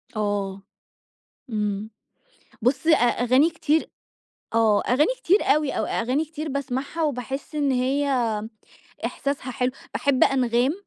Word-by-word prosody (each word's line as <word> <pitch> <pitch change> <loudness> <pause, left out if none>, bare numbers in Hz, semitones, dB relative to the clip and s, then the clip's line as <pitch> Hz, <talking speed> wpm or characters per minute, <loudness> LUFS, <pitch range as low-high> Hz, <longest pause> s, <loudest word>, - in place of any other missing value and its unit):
آه. 200 -2 -2 0.9
إمم. 210 0 -2 0.7
بُص، 260 +6 +1
أ 320 - +7
أغاني 245 +5 +3
كتير 320 -1 0 0.7
آه. 220 -2 +4
أغاني 295 - +2
كتير 390 +5 +3
أوي 300 -1 +2
أو - - -1
أغاني 255 +7 0
كتير 310 0 -6
باسمعها 280 +3 -3
وباحِس 270 +1 -3
إن 285 -2 +1
هي 265 +3 +1 1.0
إحساسها 280 -2 -3
حلو. 250 0 0 0.2
باحب 280 -2 +3
أنغام، 250 0 +2
260 Hz, 115 wpm, -24 LUFS, 235-290 Hz, 1.0 s, أ